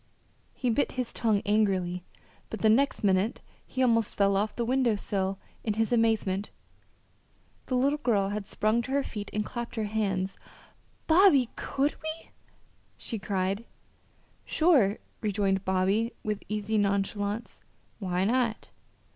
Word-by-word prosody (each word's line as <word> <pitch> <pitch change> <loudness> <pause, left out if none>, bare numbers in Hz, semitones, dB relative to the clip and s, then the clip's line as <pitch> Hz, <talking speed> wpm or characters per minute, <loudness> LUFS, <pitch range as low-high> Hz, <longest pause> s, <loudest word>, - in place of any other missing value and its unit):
He 250 -2 0
bit 280 +5 +1
his 250 -2 -3
tongue 215 -3 +1
angrily, 190 -4 +1 0.5
but 220 - -6
the 220 - +5
next 275 +3 +2
minute 195 +2 +2 0.3
he 260 - -1
almost 230 -3 +2
fell 200 -1 +3
off 210 +2 0
the 235 - -1
window 250 -2 +2
sill 195 -1 -2 0.3
in 215 -2 -1
his 225 +1 0
amazement 220 -4 +1 1.2
the 255 - 0
little 280 +4 +2
girl 205 -8 +1
had 205 -1 -4
sprung 215 +3 +1
to 245 - -7
her 280 0 +2
feet 210 -5 -6
and 210 0 -1
clapped 240 0 -5
her 220 - -1
hands. 195 -3 -1 0.7
"Bobby, 320 - +5
could 280 +2 0
we?" 315 +1 -6 0.7
she 225 - -4
cried. 195 +1 -1 0.8
"Sure!" 275 - +3 0.2
rejoined 200 -2 0
Bobby 195 +5 +1
with 210 -1 -2
easy 215 +1 0
nonchalance. 205 +2 -1 0.4
"Why 185 -2 0
not?" 235 0 0
215 Hz, 140 wpm, -28 LUFS, 200-240 Hz, 1.2 s, the